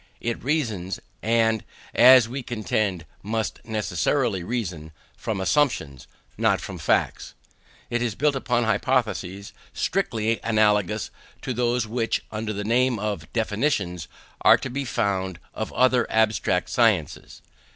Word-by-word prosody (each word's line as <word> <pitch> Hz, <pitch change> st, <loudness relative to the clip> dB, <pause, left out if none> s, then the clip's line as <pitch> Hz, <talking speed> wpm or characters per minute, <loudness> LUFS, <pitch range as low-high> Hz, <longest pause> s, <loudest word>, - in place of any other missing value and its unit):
It 120 Hz, 0 st, -3 dB
reasons, 115 Hz, -, -1 dB, 0.2 s
and, 115 Hz, -1 st, +2 dB, 0.3 s
as 125 Hz, -1 st, +8 dB
we 130 Hz, +4 st, -5 dB
contend, 105 Hz, -6 st, -2 dB, 0.2 s
must 110 Hz, +1 st, -3 dB
necessarily 110 Hz, -, 0 dB
reason, 90 Hz, -8 st, -4 dB, 0.2 s
from 110 Hz, -3 st, -3 dB
assumptions, 95 Hz, -, 0 dB, 0.3 s
not -, -, +3 dB
from -, -, -7 dB
facts. -, -, 0 dB, 0.6 s
It 120 Hz, 0 st, 0 dB
is 115 Hz, -4 st, -1 dB
built 145 Hz, 0 st, +1 dB
upon 120 Hz, -2 st, 0 dB
hypotheses, 110 Hz, -4 st, -1 dB, 0.2 s
strictly 110 Hz, 0 st, 0 dB
analogous 105 Hz, -2 st, +1 dB, 0.3 s
to 125 Hz, -, -2 dB
those 120 Hz, 0 st, 0 dB
which, 115 Hz, +1 st, -1 dB
under 110 Hz, 0 st, -3 dB
the 105 Hz, 0 st, -4 dB
name 120 Hz, +3 st, +2 dB
of 105 Hz, 0 st, -4 dB
definitions, 105 Hz, -, -1 dB, 0.3 s
are -, -, +7 dB
the 135 Hz, +1 st, -4 dB
foundation 95 Hz, -6 st, -1 dB
of 110 Hz, -, -4 dB
the -, -, -14 dB
other 125 Hz, -2 st, +3 dB
abstract 110 Hz, -4 st, +1 dB
sciences. 95 Hz, -10 st, 0 dB
110 Hz, 125 wpm, -24 LUFS, 100-120 Hz, 0.6 s, as